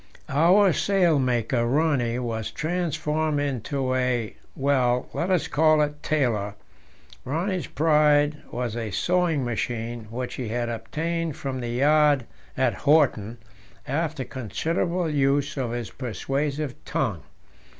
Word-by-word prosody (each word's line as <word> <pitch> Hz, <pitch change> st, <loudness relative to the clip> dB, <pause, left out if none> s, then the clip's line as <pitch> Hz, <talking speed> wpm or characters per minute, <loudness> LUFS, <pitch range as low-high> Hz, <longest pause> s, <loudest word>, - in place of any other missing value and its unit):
Our 175 Hz, +7 st, +5 dB
sailmaker, 140 Hz, -, +2 dB
Rönne, 125 Hz, -2 st, +1 dB
was 115 Hz, -3 st, -3 dB
transformed 155 Hz, -2 st, -1 dB
into 135 Hz, -1 st, -1 dB
a 125 Hz, -4 st, 0 dB, 0.2 s
well, 130 Hz, -3 st, +1 dB
let 175 Hz, -, -1 dB
us 185 Hz, -3 st, +2 dB
call 155 Hz, 0 st, +4 dB
it 150 Hz, 0 st, -4 dB
tailor. 115 Hz, -9 st, 0 dB, 0.7 s
Rönne's 175 Hz, +6 st, -2 dB
pride 150 Hz, 0 st, +3 dB
was 120 Hz, -3 st, -3 dB
a 115 Hz, -2 st, -3 dB
sewing 170 Hz, -, +1 dB
machine, 120 Hz, 0 st, -3 dB
which 125 Hz, +2 st, -4 dB
he 125 Hz, -, -4 dB
had 120 Hz, +2 st, -2 dB
obtained 155 Hz, +8 st, -3 dB
from 135 Hz, -2 st, -4 dB
the 120 Hz, -1 st, -4 dB
yard 145 Hz, +1 st, +3 dB, 0.3 s
at 130 Hz, -, +2 dB
Horten 130 Hz, -7 st, +2 dB, 0.5 s
after 145 Hz, -1 st, -2 dB
considerable 165 Hz, -, -2 dB
use 145 Hz, -1 st, +1 dB
of 130 Hz, -4 st, -2 dB
his 120 Hz, -1 st, -4 dB
persuasive 135 Hz, +3 st, -3 dB
tongue. -, -, -2 dB
140 Hz, 120 wpm, -25 LUFS, 120-155 Hz, 0.7 s, Our